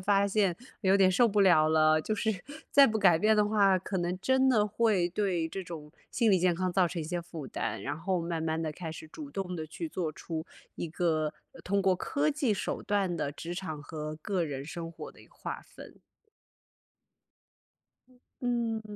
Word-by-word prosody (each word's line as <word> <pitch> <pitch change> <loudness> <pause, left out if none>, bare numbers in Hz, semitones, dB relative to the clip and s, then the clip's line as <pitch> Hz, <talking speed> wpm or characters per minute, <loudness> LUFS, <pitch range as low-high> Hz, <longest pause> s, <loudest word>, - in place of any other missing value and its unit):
发 200 +1 +3
现， 200 -4 +1 0.2
有 195 -1 +4
点 190 -1 +5
受 235 +6 +4
不 210 -1 +2
了 155 -5 +5
了， 155 0 +4
就 215 - -2
是 220 +1 0 0.4
再 280 -1 +8
不 220 0 0
改 175 -5 +5
变 215 +3 +4
的 210 - +4
话， 200 -3 +4
可 190 +1 -3
能 175 +1 -2
真 260 +4 +3
的 215 -5 +4
会 210 -4 +2
对 180 -3 -1
这 190 +3 -5
种 155 -4 -9 0.2
心 230 -3 +2
理 190 - +5
健 180 -1 +2
康 185 +1 -1
造 180 -1 +3
成 170 0 -4
一 155 - -4
些 175 +2 -2
负 165 -4 -8
担， - - -4
然 145 - -3
后 185 +1 -1
慢 165 -1 -3
慢 160 0 -1
地 155 -2 -2
开 165 +1 -6
始 160 0 -9
主 285 - -9
动 190 -5 -4
地 160 -2 -5
去 240 - -6
做 175 - -2
出 160 +1 -6 0.3
一 170 - -4
个 155 -2 0 0.3
通 200 +1 0
过 190 -1 +4
科 285 +11 0
技 280 -7 +1
手 - - -3
段 195 -3 0
的 150 -4 -2
职 170 +4 -6
场 160 -5 -5
和 155 0 -6
个 180 +3 -2
人 140 -3 -4
生 165 +2 -6
活 165 - -9
的 - - -18
一 - - -17
个 - - -27
划 - - -6
分。 - - -14 2.5
嗯， 235 -2 0
180 Hz, 220 characters per minute, -30 LUFS, 160-205 Hz, 2.5 s, 再